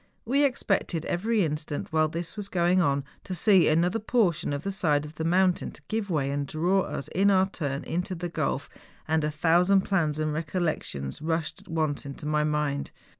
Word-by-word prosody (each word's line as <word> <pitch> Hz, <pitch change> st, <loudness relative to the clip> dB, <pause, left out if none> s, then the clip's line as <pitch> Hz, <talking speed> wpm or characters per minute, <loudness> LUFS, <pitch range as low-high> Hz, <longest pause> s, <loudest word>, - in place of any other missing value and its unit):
We 275 Hz, +5 st, +2 dB
expected 195 Hz, -, 0 dB
every 210 Hz, +2 st, +1 dB
instant 150 Hz, 0 st, -4 dB
while 155 Hz, 0 st, +3 dB
this 165 Hz, +2 st, -5 dB
was 205 Hz, -2 st, -5 dB
going 180 Hz, +1 st, +3 dB
on 140 Hz, -4 st, +1 dB, 0.2 s
to 185 Hz, -, -5 dB
see 190 Hz, -1 st, +5 dB
another 175 Hz, +7 st, +2 dB
portion 210 Hz, -9 st, +1 dB
of 145 Hz, +1 st, -3 dB
the 195 Hz, -, -2 dB
side 150 Hz, -6 st, +1 dB
of 150 Hz, -, -10 dB
the 160 Hz, -, -4 dB
mountain 180 Hz, +2 st, +2 dB, 0.2 s
give 220 Hz, -2 st, -2 dB
way 140 Hz, -5 st, 0 dB
and 140 Hz, 0 st, -2 dB
draw 175 Hz, +7 st, +1 dB
us, 145 Hz, -4 st, -4 dB
in 195 Hz, +3 st, +3 dB
our 190 Hz, -1 st, +4 dB
turn, 145 Hz, -7 st, -4 dB
into 180 Hz, +2 st, -2 dB
the 175 Hz, +1 st, -4 dB
gulf, 150 Hz, -4 st, -2 dB, 0.4 s
and 160 Hz, 0 st, +1 dB
a 150 Hz, -, +1 dB
tliousand 175 Hz, +5 st, +3 dB
plans 160 Hz, -7 st, 0 dB
and 155 Hz, -1 st, -1 dB
recollections 155 Hz, -, -2 dB
rushed 160 Hz, 0 st, -2 dB
at -, -, -22 dB
once 155 Hz, -3 st, -1 dB
into 140 Hz, +1 st, -8 dB
my 150 Hz, 0 st, +1 dB
mind. 150 Hz, -2 st, -1 dB
165 Hz, 190 wpm, -27 LUFS, 150-185 Hz, 0.4 s, see